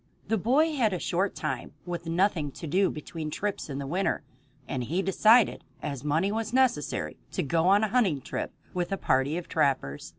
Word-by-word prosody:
The 225 - +2
boy 290 - +3
had 230 -8 +2
a - - 0
short 190 +4 0
time 150 -5 -4
with 175 -1 -5
nothing 165 -4 +1
to - - -8
do 185 +5 +2
between 155 +1 -6
trips 200 +2 -3
in 135 - -4
the 140 - -4
winter, 185 +8 -1 0.4
and 130 -2 -2
he 175 +9 -1
decided, 215 +4 +4 0.2
as 140 -3 -5
money 160 +7 +1
was 220 +1 -2
necessary, 150 - +1 0.2
to - - 0
go 165 +4 +1
on 200 +3 +5
a 215 - +1
hunting 205 - +2
trip - - -4 0.2
with 180 +1 -2
a 195 - 0
party 135 0 +1
of 175 - -5
trappers. 135 - 0
175 Hz, 195 wpm, -28 LUFS, 150-205 Hz, 0.4 s, on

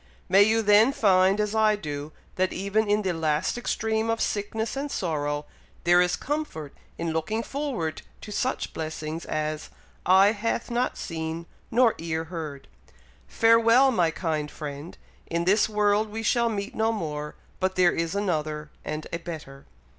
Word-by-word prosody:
May 190 +2 +6
you 220 +2 +4
then 210 +4 +6
find, 190 -2 +4
as 210 0 0
I 215 -1 +4
do, 150 -5 -6 0.2
that 185 0 +1
even 200 +3 0
in 210 +1 +2
the 185 -2 0
last 155 -2 0
extreme 220 -2 -1
of 225 0 0
sickness 220 +3 -2
and 280 +2 -3
sorrow, 145 - -2 0.4
there 175 +1 +5
is 180 -1 +2
comfort 285 - -4 0.2
in 165 -1 -2
looking 215 +8 -1
forward 255 - -3 0.2
to 210 - -9
such 255 +5 -2
blessings 155 0 -5
as 155 0 -3 0.4
'eye 190 +2 +7
hath 230 +2 -2
not 245 +2 0
seen, 160 0 -4 0.2
nor 235 -1 +4
ear 160 -1 -2
heard.' 160 -4 -7 0.6
Farewell, 230 +3 +5
my 175 -8 +2
kind 155 -3 -2
friend! 145 +2 -7 0.3
In 170 0 -1
this 205 +4 +3
world 210 0 +2
we 220 +2 -5
shall 235 +1 +2
meet 200 -2 -4
no 220 +1 +1
more, 150 -8 -4 0.2
but 185 0 0
there 180 -1 +4
is 165 +3 -2
another 155 -6 -2
and 155 0 -4
a 170 - -1
better." 155 -5 -9
185 Hz, 160 wpm, -26 LUFS, 160-220 Hz, 0.6 s, eye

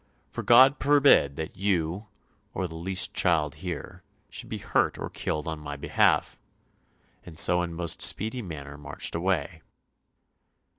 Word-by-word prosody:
For - - -5
God 130 +4 +6
forbid 140 - +4
that 80 0 -6
you, 95 0 -1 0.5
or 95 - -2
the 80 - -11
least 90 +3 0
child 80 -5 +2
here, 90 -2 -6 0.3
should - - -8
be - - -4
hurt - - 0
or - - -6
killed 75 +1 -3
on 80 -1 -4
my 75 -1 -7
behalf,' 70 - +1 0.8
and 80 -3 -12
so 90 +2 +4
in 85 -1 -4
most 85 -1 -3
speedy 110 +4 0
manner 75 -7 -9
marched 75 - -3
away." 85 -2 -2
85 Hz, 145 wpm, -26 LUFS, 80-95 Hz, 0.8 s, God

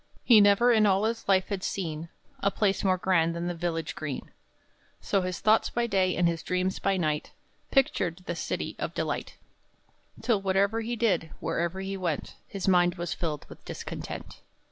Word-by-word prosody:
He 225 -4 +7
never, 205 +4 +5
in 215 -2 +5
all 195 +1 +3
his 225 +1 -2
life, 190 -1 +3
had 195 -2 -3
seen 165 -3 -3 0.3
A 200 - +2
place 200 -1 0
more 185 -2 +3
grand 170 -3 +2
than 170 +1 -3
the 175 - -1
village 165 -1 -3
green; 150 -4 -5 0.7
So 195 - +1
his 180 -1 -3
thoughts 215 +1 +4
by 240 0 0
day, 190 -4 +1
and 175 - +3
his 165 -1 -1
dreams 180 +1 -1
by 195 -1 +1
night, 155 -4 -1 0.4
Pictured 185 - +1
this 170 - -4
city - - -3
of - - -4
delight, - - -3 0.9
Till 220 -5 +2
whatever 200 +3 +1
he 235 +2 -2
did, 195 -8 +1
wherever 170 +3 -2
he 195 0 -4
went, 170 -6 -2
His 195 -1 -5
mind 175 -1 +4
was 175 -1 -3
filled 155 -4 -3
with - - -13
discontent. - - -7
185 Hz, 180 wpm, -28 LUFS, 170-200 Hz, 0.9 s, He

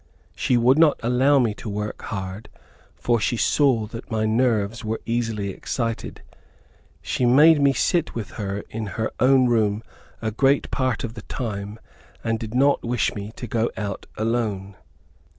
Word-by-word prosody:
She 125 - +1
would 125 +5 +4
not 160 -3 +5
allow 130 +4 +3
me 120 -5 +2
to 105 +2 -8
work 105 +1 -4
hard, 95 +1 -6 0.5
for 120 -1 +1
she 120 - 0
saw 130 -4 +2
that 115 +3 -9
my 110 -2 0
nerves 115 -1 +1
were 110 +1 -2
easily 115 -4 -1
excited. 115 +3 -4 0.8
She - - -2
made 145 +5 +6
me 140 -1 +5
sit 165 +5 0
with 115 -3 -5
her 100 -1 -4
in 110 -1 -4
her 110 -1 -1
own 130 0 +5
room 110 -2 +1 0.4
a 110 -1 -2
great 135 +5 +2
part 130 -2 -1
of 115 -3 -4
the 115 - -8
time, 105 -2 -5 0.4
and 115 0 -1
did 110 +1 -6
not 140 +2 +3
wish 120 -1 0
me 105 +1 -6
to - - -6
go 115 0 0
out 100 -2 -4
alone. 105 -4 -2
115 Hz, 165 wpm, -23 LUFS, 105-125 Hz, 0.8 s, made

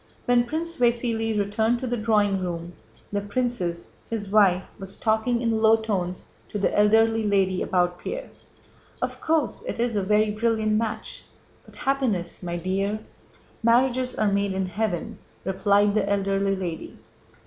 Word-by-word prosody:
When 245 0 +3
Prince 330 +5 -3
Vasíli 230 -3 +1
returned 220 +3 +1
to 260 - -5
the 245 -1 -1
drawing 210 -3 +2
room, 175 -1 -4 0.4
the 205 0 -1
princess, 205 -6 -2 0.2
his 210 -3 -4
wife, 190 -3 +4 0.2
was 195 0 -8
talking 230 +2 +1
in 225 -1 +1
low 220 0 +6
tones 195 -5 -3 0.2
to - - -4
the 200 - 0
elderly 225 +2 +4
lady 190 -2 +2
about 180 -1 +1
Pierre. - - -5 0.7
"Of - - -3
course, 315 -5 0
it - - -4
is 235 -1 0
a 205 - +2
very 210 +2 +2
brilliant 220 0 0
match, 220 0 -2 0.4
but - - -16
happiness, 255 -11 -1
my 175 -1 -3
dear..." 195 +4 -1 0.6
"Marriages 250 +2 +2
are 205 -2 +1
made 200 -1 +1
in 190 0 -1
heaven," 185 -2 -3 0.3
replied 200 +2 +3
the 210 -1 +1
elderly 195 0 +1
lady. 175 -4 -5
210 Hz, 150 wpm, -25 LUFS, 195-230 Hz, 0.7 s, low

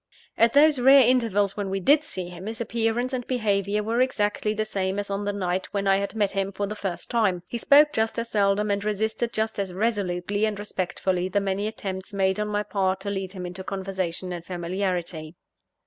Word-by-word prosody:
At 230 0 +4
those 295 -1 +5
rare 265 0 +7
intervals 205 -6 +2
when 205 -2 -3
we 195 0 -1
did 290 +10 +4
see 185 -12 -5
him, 180 +3 -9
his 225 0 -5
appearance 235 +2 -1
and 250 -2 -3
behaviour 210 -4 0
were 230 +3 0
exactly 210 -4 0
the 215 0 -1
same 195 -2 -2
as 205 0 -3
on 200 +1 -2
the 205 - 0
night 185 -2 -2
when 200 0 0
I 195 0 +4
had 200 +2 -3
met 205 -3 +1
him 195 0 -1
for 200 +1 -2
the 205 - -4
first 185 -5 -5
time; 200 -7 +1
he 235 +6 -5
spoke 295 +4 +6
just 220 0 0
as 230 0 -2
seldom, 205 0 +2
and 200 0 -1
resisted 220 +3 -1
just 220 -1 -2
as 190 -3 -3
resolutely 205 -1 0
and 215 -2 -2
respectfully 185 -2 -2
the 205 - +1
many 200 +1 -1
attempts 195 -3 -6
made 190 0 +1
on 210 - -1
my 210 0 -1
part 190 -2 0
to 200 - -3
lead 190 -1 -4
him 185 -2 -6
into 180 +2 -7
conversation 185 -2 -3
and 170 -1 -6
familiarity. 175 -2 -3
200 Hz, 210 wpm, -25 LUFS, 190-220 Hz, -, rare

